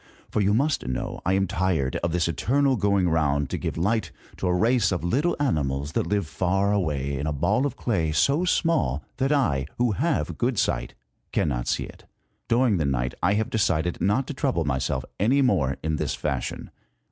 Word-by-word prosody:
For 105 - +1
you 100 +1 +3
must 140 - 0
know 65 - -3
I 95 - +3
am 95 0 +2
tired 90 -8 0
of 85 - -2
this 85 0 +1
eternal 130 - +1
going 100 -4 +2
round 75 -4 +1
to - - -1
give - - -3
light 105 +7 0 0.3
to 95 - -2
a 90 - +2
race 115 +1 +2
of 90 - -2
little 140 - +1
animals 70 - 0
that 80 - -1
live 100 0 0
far 95 +5 0
away 70 -8 -1
in 75 - -2
a - - 0
ball 100 - +1
of 135 - -7
clay, 85 -10 0
so 140 - +2
small 80 - +1
that 135 +2 +1
I, 75 - +1
who 120 -1 +2
have 145 - -1
good 120 -1 0
sight, - - -1 0.4
cannot - - -1
see - - 0
it. - - -12 0.4
During 115 -3 +3
the 80 - 0
night 65 -2 -1
I 95 +4 +3
have 110 +1 -1
decided 90 -5 0
not 105 +7 +2
to 150 - -5
trouble 130 - 0
myself 65 -2 -1
any 130 +8 +3
more 70 - +1
in 80 0 -1
this - - -2
fashion. - - -3
95 Hz, 195 wpm, -25 LUFS, 75-120 Hz, 0.4 s, you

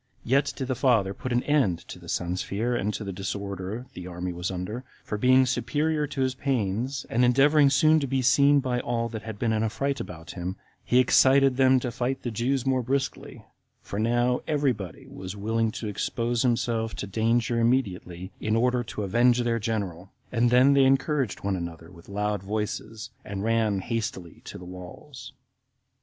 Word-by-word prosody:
Yet 135 +4 +2
did 130 - -4
the 130 - 0
father 115 -6 +2
soon - - -11
put 130 - -3
an 120 0 +1
end 135 - +2
to - - -9
the - - -12
son's 90 +1 -1
fear, 115 +5 -2
and 105 -2 0
to - - -5
the 100 -1 -5
disorder 100 +3 -5
the 90 - -8
army 90 0 -4
was 90 +1 -3
under, 95 +7 -5 0.2
for - - -4
being 130 +4 +5
superior 150 +3 0
to 145 -1 -4
his 130 -1 +1
pains, 130 0 -2
and 120 +2 +1
endeavoring 140 +4 +5
soon 155 +3 +4
to 140 - -2
be 130 0 0
seen 140 +2 +5
by 125 -2 -1
all 115 -1 -2
that 110 -2 -6
had 110 -2 -7
been 115 0 0
in 110 - +1
a 110 - +1
fright 140 +5 -2
about 80 -2 -8
him, 90 +1 -5 0.3
he 125 - +2
excited 130 +1 +5
them 130 0 +5
to 125 - -3
fight 125 +3 -2
the 120 - -3
Jews 125 +4 -1
more 130 -1 +2
briskly; 130 +1 -3 0.4
for 100 - -5
now 120 +2 +2
every 145 -3 +2
body 95 -6 -9
was 95 +1 -8
willing 110 +2 0
to 110 - -5
expose 115 +3 -1
himself 115 -2 0
to - - -4
danger 115 +4 +1
immediately, 95 -7 -1
in 110 0 0
order 125 +1 +2
to 105 +1 -5
avenge 120 +5 +3
their 115 -1 0
general; 100 -5 -3 0.2
and 120 0 +2
then 125 +3 +5
they 140 -1 +5
encouraged 135 -3 +1
one 100 -1 0
another 85 -1 -7
with 85 0 -16
loud 105 0 -1
voices, 105 +2 -4
and 100 -1 -5
ran 110 -3 +1
hastily 115 -6 -4
to - - -8
the 90 - -10
walls. 90 +9 -10
115 Hz, 195 wpm, -26 LUFS, 100-130 Hz, 0.4 s, being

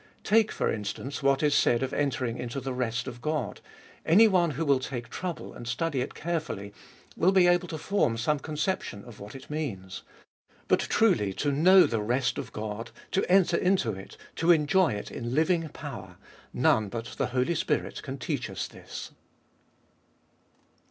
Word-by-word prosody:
Take, 220 +1 +3
for - - 0
instance, 110 +6 -5
what 135 +1 +2
is 150 -1 +3
said 120 -3 +3
of 130 +1 -3
entering 125 -4 -1
into 125 +2 -4
the 135 0 -4
rest 120 -1 -2
of 120 -2 -7
God, 155 +3 -2 0.4
anyone 185 -1 +5
who 165 - -1
will 140 -2 +4
take 120 -2 -5
trouble, 180 +3 -5
and 120 - -9
study 135 +2 -1
it 130 - -5
carefully, 150 -12 -3 0.4
will 180 +3 +3
be 190 -2 +5
able 175 0 +3
to 160 - -5
form 155 - 0
some 145 +6 +1
conception 150 - -3
of 120 -3 -12
what 105 +5 -10
it 135 - -10
means. 100 -12 -4 0.7
But - - +4
truly 115 - +2
to 145 +8 0
know 180 +6 +7
the 115 -2 -1
rest 120 +3 0
of - - -6
God, 105 +1 -5 0.2
to 190 -1 0
enter 180 -2 +5
into 180 -11 +2
it, 95 -1 -9 0.2
to 165 +2 +4
enjoy 170 - +3
it 105 - -6
in 120 +1 -4
living 165 +1 +2
power, 100 - -8 0.2
— - - -28 0.2
none 105 -2 +1
but 115 +2 -5
the - - +1
Holy 125 +6 0
Spirit - - -1
can - - -6
teach - - -3
us - - -4
this. - - -9
140 Hz, 175 wpm, -28 LUFS, 115-170 Hz, 0.7 s, know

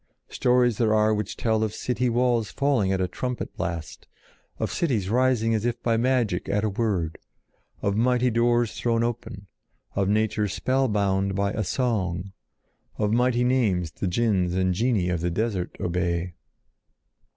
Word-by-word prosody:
Stories 125 -2 +2
there 110 -2 +3
are 110 0 +3
which 105 -1 -3
tell 110 -1 +1
of 110 -1 -2
city 125 0 -1
walls 120 -2 +1
falling 135 -9 +1
at 95 - 0
a 90 - +1
trumpet 125 +5 -4
blast, 85 -2 -5 0.5
of - - -2
cities 110 - -1
rising 120 -2 +2
as 110 -1 0
if 120 0 -1
by 115 -1 +2
magic 115 -6 0
at 105 +1 +1
a 110 - +1
word, 95 -6 -1 0.6
of 100 0 +1
mighty 125 +2 +2
doors 120 0 +2
thrown 115 -1 0
open, 115 -4 -4 0.5
of 100 -1 0
nature 105 0 +1
spellbound 100 -5 0
by 100 0 0
a 110 - -1
song, 95 -6 -1 0.7
of 105 0 0
mighty 125 0 +2
names 105 -10 +1
the 95 - -4
jinns 90 -3 +1
and 95 0 +1
genii 105 -3 +1
of 85 -2 -1
the 90 - 0
desert 95 0 -2
obey. 90 0 -1
110 Hz, 155 wpm, -25 LUFS, 95-120 Hz, 0.7 s, there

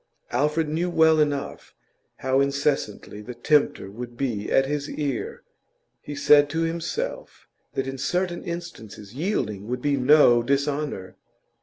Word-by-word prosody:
Alfred 150 +5 +1
knew 165 +4 -1
well 160 -2 +4
enough 145 -2 -2 0.5
how 130 +1 +3
incessantly 140 -7 -1
the 120 +3 -8
tempter 120 -6 +1
would 120 +2 -8
be 115 -7 -2
at 135 - +4
his 145 +1 -3
ear; 140 -5 -4 0.6
he 145 - -7
said 145 0 +5
to 160 +3 -1
himself 165 0 -4 0.3
that 135 - -1
in 135 0 -5
certain 175 +5 -1
instances 115 - -8
yielding 125 - -2
would 125 +1 -2
be 140 +2 0
no 130 -3 +6
dishonour. 140 -5 -2
140 Hz, 135 wpm, -24 LUFS, 125-155 Hz, 0.6 s, no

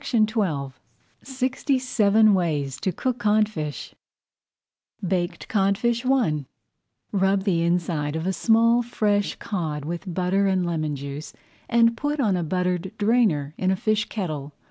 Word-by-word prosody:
[Page 255 - -3
91] 200 - +1 0.5
SIXTY 265 +1 -1
SEVEN 220 -4 +3
WAYS 150 -8 0
TO 185 - -1
COOK 250 +7 -2
CODFISH 210 -9 0 1.1
BAKED 175 0 -2
CODFISH 225 +4 +1
I 195 - +1 0.7
Rub 195 -1 +2
the 180 -5 +1
inside 165 -3 0
of 160 +1 -3
a 190 - 0
small 230 +3 +3
fresh 210 -4 0
cod 155 -7 -4
with 175 +3 -5
butter 185 +3 +1
and 185 -2 +1
lemon 155 -3 -2
juice 140 +2 -7 0.4
and 230 -1 +4
put 290 +4 -2
on 210 -8 +2
a 180 - -1
buttered 180 +2 -1
drainer 205 -10 +2
in 185 - +1
a 190 - +3
fish 215 +2 0
kettle. 150 -9 -4
190 Hz, 140 wpm, -24 LUFS, 165-225 Hz, 1.1 s, and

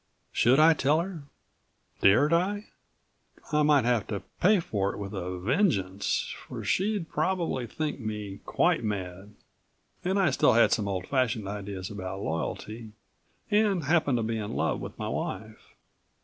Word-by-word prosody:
Should 125 +3 +4
I 160 +1 +7
tell 150 +1 +2
her, 170 -5 -7 0.8
dared 140 +11 +5
I? 200 +5 0 0.8
I 150 0 +3
might 145 -4 +4
have 120 -4 +1
to 100 -3 -4 0.2
pay 200 +2 +5
for 100 - -1
it - - -8
with 100 0 -6
a 90 -1 -4
vengeance, 100 - 0
for - - -6
she'd 195 -2 0
probably 160 -7 -1
think 150 +5 -3
me 105 -3 -5
quite 175 -7 +1
mad. 95 -1 -5 0.7
And 190 +2 0
I 185 -6 +3
still - - +4
had 115 - +5
some 105 -4 +1
old 95 -2 -2
fashioned 120 -5 0
ideas 100 -2 -5
about 95 -2 -5
loyalty 110 +7 -4 0.6
and 205 -5 +3
happened 145 -3 +2
to 115 - -1
be 115 0 -2
in 105 -1 -4
love - - 0
with - - -8
my - - -4
wife. 110 +3 -5
115 Hz, 155 wpm, -28 LUFS, 100-160 Hz, 0.8 s, I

